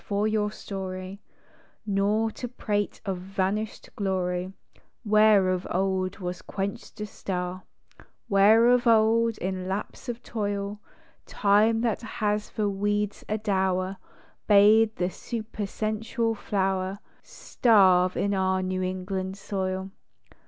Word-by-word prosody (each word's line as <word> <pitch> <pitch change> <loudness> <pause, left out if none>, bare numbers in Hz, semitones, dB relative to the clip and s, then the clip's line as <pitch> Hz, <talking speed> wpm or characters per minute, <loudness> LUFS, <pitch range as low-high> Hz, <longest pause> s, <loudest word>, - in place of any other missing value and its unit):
for 205 +1 0
your 215 -1 +1
story, 190 -1 -6 0.6
Nor 210 +2 +1
to 245 - -6
prate 205 -4 -2
of 190 -3 -2
vanished 195 +3 -3
glory 185 -2 -1 0.5
Where 210 -3 +5
of 185 0 -1
old 185 0 -1
was 180 -3 -5
quenched 195 +1 -5
a - - -2
star; 185 -2 -5 0.6
Where, 205 +4 +5
of 245 0 +4
old, 230 0 +4
in 185 0 -3
lapse 200 +6 -5
of 240 0 -5
toil, 205 -1 -3 0.5
Time, 215 +3 +3
that 230 -3 0
has 210 -2 -2
for 215 -2 -1
weeds 205 +1 -1
a 215 - 0
dower, 190 -2 0 0.5
Bade 215 +2 +6
the 180 +1 -1
supersensual 220 +1 -3
flower 195 -2 -1 0.2
Starve 185 -6 +3
in 200 0 0
our 190 -1 +1
New 185 0 -2
England 185 +1 -3
soil. 190 -1 -3
200 Hz, 115 wpm, -26 LUFS, 190-215 Hz, 0.6 s, Bade